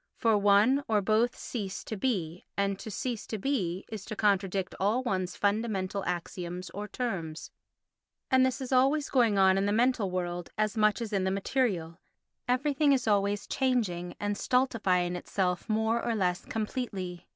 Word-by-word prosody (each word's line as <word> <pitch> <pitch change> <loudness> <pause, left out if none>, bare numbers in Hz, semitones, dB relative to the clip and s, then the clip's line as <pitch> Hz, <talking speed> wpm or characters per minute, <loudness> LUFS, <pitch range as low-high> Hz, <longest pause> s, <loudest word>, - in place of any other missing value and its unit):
For 225 -3 +3
one 205 +7 +4
or 215 -2 +3
both 220 +5 +2
cease 200 -6 -5
to 220 - -5
be, 185 -7 -2
and 200 -1 0
to - - -7
cease 235 +2 -4
to 220 - -3
be 190 -7 -1
is 215 -3 -6
to 215 - -5
contradict 195 -2 +1
all 215 +7 +1
one's 185 -6 -2
fundamental 200 -2 -1
axioms 180 0 -4
or 205 +2 -5
terms. 190 -9 -4 0.8
And 260 0 +5
this 260 +1 0
is 260 - -5
always 270 +3 +3
going 235 -6 +3
on 190 0 +5
in 200 - +1
the - - +1
mental 230 -2 +2
world 175 -1 -3
as 215 0 0
much 215 +1 +2
as 220 -2 -6
in 195 -2 +1
the 190 - +1
material; 190 -5 -1 0.5
everything 280 +3 +2
is 255 -4 0
always 205 -1 +1
changing 210 -10 -1
and 205 0 -1
stultifying 195 -9 +1
itself 180 +2 -2
more 220 +2 +1
or 230 - 0
less 180 -3 0
completely. 210 -6 -4
205 Hz, 165 wpm, -29 LUFS, 185-240 Hz, 0.8 s, And